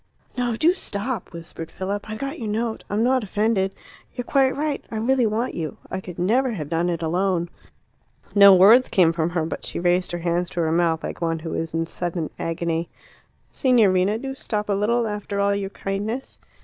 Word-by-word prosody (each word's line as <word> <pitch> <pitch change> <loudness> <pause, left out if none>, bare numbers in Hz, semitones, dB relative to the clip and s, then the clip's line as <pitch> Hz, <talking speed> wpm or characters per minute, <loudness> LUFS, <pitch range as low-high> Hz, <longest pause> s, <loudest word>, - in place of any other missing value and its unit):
"No, 245 -2 0
do 320 +9 +4
stop!" 235 - -3
whispered 165 -1 -8
Philip. 200 +2 -4
"I 215 - -4
got 275 +7 -5
your 225 - -4
note. 220 +2 -2
I'm 210 +3 +1
not 255 0 +2
offended; 205 -1 +1 0.4
you're 245 -1 -4
quite 270 0 +2
right. 295 -1 -2
I - - -6
really 245 +2 +2
want 220 +4 -1
you; 160 -3 -4
I 190 - -3
could 180 -2 -9
never 240 +7 +2
have 155 -8 -5
done 170 +2 0
it 170 -1 -2
alone." 175 +1 0 0.8
No 200 -1 +9
words 220 +8 +7
came 170 -3 +4
from 165 0 0
her, 170 -2 -1
but 160 - -5
she - - -4
raised 180 +1 +1
her - - -1
hands 175 +1 -1
to 175 - -2
her 160 -1 +1
mouth, 165 -1 +1
like - - -6
one 165 -1 0
who 160 0 -6
is 165 0 -3
in 165 0 0
sudden 170 -1 -3
agony. 165 0 -2 0.6
"Signorina, 210 -6 +3
do 270 +3 -5
stop 210 -5 -3
a - - +3
little 230 +4 +1
after 210 -1 -3
all 200 0 +2
your 200 -1 -2
kindness." 205 +7 -4
200 Hz, 200 wpm, -23 LUFS, 170-230 Hz, 0.8 s, No